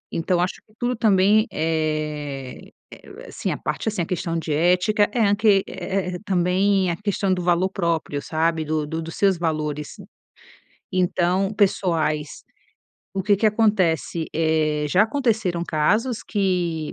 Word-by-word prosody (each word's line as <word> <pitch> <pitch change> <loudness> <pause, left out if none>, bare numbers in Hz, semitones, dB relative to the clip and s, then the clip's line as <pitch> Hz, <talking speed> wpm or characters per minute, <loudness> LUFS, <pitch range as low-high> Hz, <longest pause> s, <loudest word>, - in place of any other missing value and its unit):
Então, 175 +2 0
eu - - +1
acho 180 - -2
que 215 - -27
tudo 245 +1 0
também, 215 0 +3
eh 155 -4 -3 0.2
eh, - - -13
assim, - - -4
a - - -3
parte - - -4
assim, 205 -5 -2
a - - -4
questão 165 -1 -2
de 160 -2 -3
ética 180 +7 +2
é 235 - 0
a 200 - +3
que 205 -3 +3
é 185 +1 -3
é - - -5
é - - -6
também 185 +1 +2
a - - -2
questão 200 0 -1
do 180 - -2
valor 175 +1 +2
próprio, 165 -6 -2
sabe 160 0 0
do 155 0 -1
do 160 +2 -4
dos 165 0 -7
seus 195 -3 +3
valores, 150 -3 -3 1.0
então 185 +1 +1
pessoais. 160 -7 0 0.7
O 195 - -1
que 205 0 +3
que 215 - +2
acontece? 185 - +1
Eh, 155 -2 +1
já 185 +6 +4
aconteceram 220 -8 0
casos 210 +11 0
que, 180 -6 -1
180 Hz, 160 wpm, -22 LUFS, 160-200 Hz, 1.0 s, já